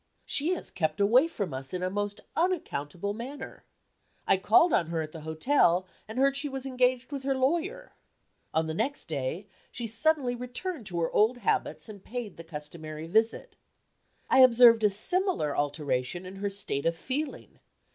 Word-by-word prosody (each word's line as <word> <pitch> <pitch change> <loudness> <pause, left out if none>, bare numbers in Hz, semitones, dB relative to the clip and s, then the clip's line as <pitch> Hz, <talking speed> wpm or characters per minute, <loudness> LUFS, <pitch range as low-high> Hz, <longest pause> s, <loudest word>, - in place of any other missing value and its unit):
She 325 +6 +1
has - - -5
kept 155 -1 -1
away 240 +9 +5
from 200 - -4
us 135 +6 -5
in 180 - -3
a 185 - 0
most 205 0 -3
unaccountable 200 - -1
manner. 265 +5 -8 0.6
I - - +5
called 225 - +4
on 170 - +3
her 165 -1 -2
at 155 - -8
the 160 - -9
hotel, 175 - +2 0.2
and 220 +3 -8
heard 275 +1 +3
she 280 +1 -1
was 270 -1 -5
engaged 255 0 +1
with 280 -2 -4
her 270 0 0
lawyer. 330 - -1 0.6
On 160 0 +1
the 160 - -3
next 250 - -2
day, 155 +5 -3 0.3
she 240 - -5
suddenly 255 +3 +1
returned 250 - -5
to 175 -2 -3
her 165 - 0
old 220 +4 +3
habits, 245 - -1
and 205 -3 -11
paid 235 -4 -6
the 165 - -8
customary 155 0 -7
visit. 220 +7 0 0.7
I - - +4
observed 240 -3 +7
a 210 - +6
similar 220 - +1
alteration 145 +2 -1
in 190 +1 -9
her 200 +1 -2
state 195 -7 -3
of 165 - +1
feeling. 270 - -4
215 Hz, 175 wpm, -28 LUFS, 165-265 Hz, 0.7 s, observed